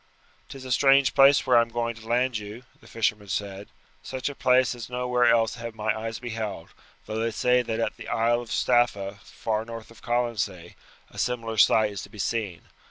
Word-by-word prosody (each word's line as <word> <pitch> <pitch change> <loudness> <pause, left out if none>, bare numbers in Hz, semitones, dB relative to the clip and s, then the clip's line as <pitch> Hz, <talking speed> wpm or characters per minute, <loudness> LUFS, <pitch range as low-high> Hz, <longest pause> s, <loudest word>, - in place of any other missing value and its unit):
"'Tis 135 -1 -9
a 130 - -6
strange 135 +1 +4
place 140 0 +6
where 125 - +3
I 120 - +7
am 115 - -2
going 115 0 -2
to 110 0 -14
land 120 0 +1
you," 105 +4 -9 0.2
the - - -18
fisherman 105 -2 -1
said; 100 +1 -4 0.3
"such 130 +2 -4
a 145 - -8
place 130 -1 +3
as 120 -1 -8
nowhere 125 0 +1
else 115 -1 +3
have 115 -1 -7
my 110 0 -1
eyes 115 0 -4
beheld, 115 -7 -5 0.4
though 110 - -4
they 115 +1 0
say 125 +2 +2
that 115 -2 -3
at 115 - -2
the - - -10
Isle 120 +1 +1
of 120 - -11
Staffa, 105 -5 +1
far 110 +1 -3
north 115 0 -9
of 115 - -17
Colonsay, 115 -8 -2 0.4
a - - -9
similar 115 -2 -2
sight 110 0 +5
is 100 -2 -6
to - - -10
be 105 - -14
seen. 100 -4 -3
115 Hz, 205 wpm, -26 LUFS, 110-125 Hz, 0.4 s, I